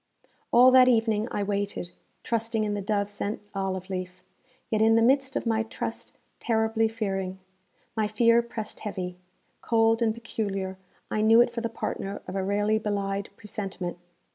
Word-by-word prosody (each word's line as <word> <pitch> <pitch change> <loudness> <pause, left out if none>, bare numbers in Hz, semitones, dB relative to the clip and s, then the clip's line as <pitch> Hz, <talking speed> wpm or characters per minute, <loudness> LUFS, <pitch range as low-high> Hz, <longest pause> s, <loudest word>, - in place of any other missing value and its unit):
All 250 +2 +7
that 255 -1 +7
evening 225 -2 +2
I 205 - -2
waited, 200 -3 -2 0.3
trusting 225 -1 0
in 210 -1 -1
the 205 - -2
dove 200 0 0
sent 205 +1 -4
olive 190 -2 -3
leaf, 185 -1 -5 0.5
yet 215 -1 +2
in 225 0 +5
the 230 - +5
midst 270 +2 +3
of - - -1
my 225 -1 +2
trust 225 - -5 0.3
terribly 225 -1 +1
fearing. 195 -4 -3 0.6
My 215 -2 +1
fear 230 +2 +4
pressed 230 -2 -6
heavy. 180 -4 -5 0.4
Cold 225 0 +3
and 225 -1 +3
peculiar, 200 -4 -4 0.3
I 215 - +1
knew 225 +2 +6
it 240 0 +5
for 235 0 -4
the 230 - -2
partner 200 -3 -4
of 185 - -5
a 195 - 0
rarely 205 +2 +1
belied 200 -2 -2
presentiment. 195 -4 -5
215 Hz, 165 wpm, -27 LUFS, 195-225 Hz, 0.6 s, All